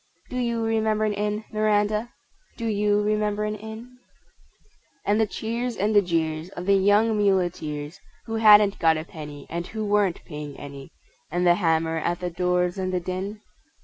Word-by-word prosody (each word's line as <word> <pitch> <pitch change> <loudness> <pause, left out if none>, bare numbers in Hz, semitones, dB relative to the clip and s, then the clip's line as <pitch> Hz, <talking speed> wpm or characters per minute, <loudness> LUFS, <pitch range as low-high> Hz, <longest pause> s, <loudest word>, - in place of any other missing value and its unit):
Do 250 - -3
you 235 -2 0
remember 220 -1 +1
an 210 - 0
Inn, 210 +1 -2
Miranda, 215 +1 +1 0.5
Do 230 - -4
you 210 -1 +2
remember 210 0 0
an 210 0 -1
Inn? 220 +4 -10 1.1
And 210 +2 +2
the 220 - +2
cheers 235 +3 -3
and 210 +3 +1
the 205 - +7
jeers 165 -2 -1
of 180 -2 -7
the 200 - +4
young 205 +3 +4
muleteers 175 -6 -1 0.3
Who 225 -1 -3
hadn't 210 -2 +6
got 160 -2 +4
a 155 - -4
penny, 150 -4 -9
And 170 +1 -4
who 220 -1 -4
weren't 205 -3 +1
paying 150 -2 -7
any, 140 -1 -9 0.4
And 175 +2 0
the 175 - +7
hammer 165 -2 +1
at 170 +2 -1
the 180 -1 -3
doors 180 +1 0
and 185 0 -1
the 180 - 0
din? 190 +4 -5
205 Hz, 175 wpm, -25 LUFS, 175-215 Hz, 1.1 s, the